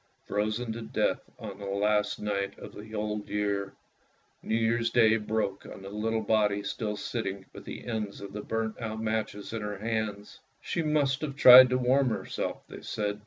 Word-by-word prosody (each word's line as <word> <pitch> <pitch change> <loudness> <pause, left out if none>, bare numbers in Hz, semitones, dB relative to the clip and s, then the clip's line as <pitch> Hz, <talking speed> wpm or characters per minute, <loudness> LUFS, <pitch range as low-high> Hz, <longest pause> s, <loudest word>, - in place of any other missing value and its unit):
Frozen 110 +3 -1
to 115 - -6
death 110 - -1
on 100 -3 -8
the 100 - -6
last 105 +1 +1
night 100 -1 -2
of - - -10
the 110 +1 -9
old 105 0 -3
year. 100 -1 -1 0.7
New 110 - -1
Year's 115 +1 +1
Day 115 -2 +5
broke 105 -2 -2
on 95 - -10
the 95 - -8
little 110 +2 -1
body 105 -1 +2
still 105 -1 -3
sitting 100 -3 -4
with - - -11
the - - -8
ends 110 -4 -3
of 100 -1 -9
the 105 - -4
burnt 110 +2 -3
out 110 -1 -4
matches 110 -1 -3
in 115 - -3
her 105 -1 -4
hand. 105 -1 -3 0.2
She 175 - -2
must 145 -4 +1
have 145 -3 -3
tried 130 -2 +10
to 125 - +2
warm 130 +1 +3
herself, 110 - -3
they - - -10
said. 105 -1 -3
110 Hz, 185 wpm, -29 LUFS, 105-115 Hz, 0.7 s, tried